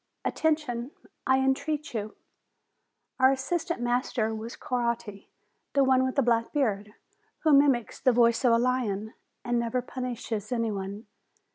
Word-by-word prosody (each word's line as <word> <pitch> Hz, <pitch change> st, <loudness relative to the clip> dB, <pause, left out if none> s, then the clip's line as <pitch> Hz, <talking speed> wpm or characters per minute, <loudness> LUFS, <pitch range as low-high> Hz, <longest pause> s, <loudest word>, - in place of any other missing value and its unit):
Attention! 285 Hz, -6 st, 0 dB, 0.4 s
I 265 Hz, 0 st, +5 dB
entreat 295 Hz, +3 st, -1 dB
you." 215 Hz, -2 st, -4 dB, 1.0 s
Our 260 Hz, +1 st, +6 dB
assistant 320 Hz, +2 st, -2 dB
master 240 Hz, -2 st, 0 dB
was 220 Hz, +2 st, -6 dB
Coatti, 235 Hz, -4 st, -3 dB, 0.4 s
the 280 Hz, -, +4 dB
one 260 Hz, -1 st, +4 dB
with 260 Hz, 0 st, -1 dB
the 275 Hz, -, +3 dB
black 230 Hz, -1 st, +1 dB
beard, 210 Hz, -7 st, -1 dB, 0.5 s
who 310 Hz, -2 st, +4 dB
mimics 275 Hz, -5 st, +3 dB
the 255 Hz, -, +4 dB
voice 235 Hz, 0 st, +3 dB
of 245 Hz, -, +5 dB
a -, -, +5 dB
lion, 230 Hz, -4 st, -1 dB, 0.3 s
and 240 Hz, -1 st, +1 dB
never 235 Hz, +1 st, -1 dB
punishes 240 Hz, -4 st, -5 dB
any 230 Hz, -2 st, 0 dB
one. 200 Hz, +2 st, -5 dB
240 Hz, 140 wpm, -28 LUFS, 225-265 Hz, 1.0 s, Our